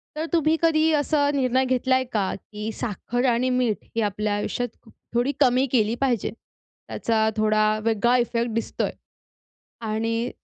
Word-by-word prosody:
तर 315 - -2
तुम्ही 320 -1 +3
कधी 320 -1 +3
असा 290 -1 +2
निर्णय 260 -1 +2
घेतला 260 0 +2
आहे 260 - +2
का, 200 -3 0
की 210 +2 -7
साखर 245 +3 -3
आणि 245 +2 +1
मीठ 250 -4 0
ही 230 - +1
आपल्या 210 0 -1
आयुष्यात 225 +2 -4 0.2
थोडी 245 +4 +2
कमी 255 -1 +4
केली 225 -2 +2
पाहिजे? 245 -6 +1 0.6
त्याचा 220 -1 +1
थोडा 215 0 +3 0.2
वेगळा 230 +2 +2
इफेक्ट 235 -1 0
दिसतो 230 - -2
आहे. - - -2 0.9
आणि 225 +2 -1
240 Hz, 150 wpm, -24 LUFS, 220-260 Hz, 0.9 s, कमी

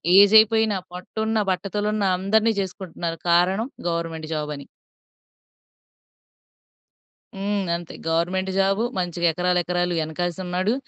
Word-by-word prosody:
Age 205 +2 +7
అయిపోయిన, 220 0 +3 0.2
పొట్ట 180 +1 -10
ఉన్న, 220 0 0
బట్టతల 200 +3 -2
ఉన్న 215 -1 -1
అందరిని 220 +4 +2
చేసుకుంటున్నారు 175 -3 -5
కారణం 185 +7 +3 0.2
గవర్నమెంట్ 165 -1 -3
జాబ్ 150 -1 -3
అని. 140 - -11 2.7
హ్మ్. 200 -1 -2
అంతే 170 -1 -7
గవర్నమెంట్ 180 +4 0
జాబు. 195 +3 +2 0.2
మంచిగా 175 -1 0
ఎకరాలు, 180 +1 +1
ఎకరాలు 175 0 -1
ఎనకేసి 175 +3 -3
ఉన్నాడు. 185 +4 0
180 Hz, 115 wpm, -23 LUFS, 170-200 Hz, 2.7 s, Age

